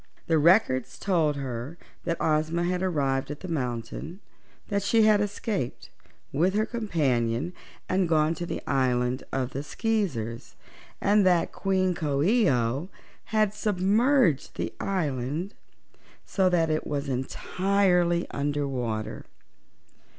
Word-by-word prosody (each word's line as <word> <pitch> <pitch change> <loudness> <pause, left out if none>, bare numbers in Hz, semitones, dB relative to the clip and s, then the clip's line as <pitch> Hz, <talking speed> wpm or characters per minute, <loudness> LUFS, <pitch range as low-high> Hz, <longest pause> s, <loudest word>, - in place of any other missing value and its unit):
The 160 -2 +2
Records 150 - +3
told 165 -7 +1
her 135 +3 -5 0.3
that 170 -1 -1
Ozma 160 +2 +1
had 180 +1 0
arrived 140 -8 0
at 145 0 -6
the 185 - -6
mountain, 125 - -4 0.5
that 200 -1 0
she 215 +3 +3
had 215 -1 +5
escaped, 205 - -3 0.4
with 175 +7 +2
her 215 +1 +2
companion, 150 - 0 0.3
and 185 -2 +1
gone 155 0 +3
to 175 +1 -5
the - - -4
island 125 -1 +1
of 130 -1 -1
the 135 - -3
Skeezers, 150 - -2 0.4
and 205 +1 +4
that 175 -2 +3
Queen 190 -1 +1
Coo 145 -4 -1
ee 215 +1 +4
oh 130 +6 0 0.4
had 215 -2 +1
submerged 210 - +2
the - - -3
island 155 - -2 0.7
so 190 -2 +2
that 165 -3 +2
it 155 - -1
was 145 -1 -2
entirely 180 +6 +1
under 145 0 -1
water. 115 -5 -3
165 Hz, 130 wpm, -27 LUFS, 135-195 Hz, 0.7 s, had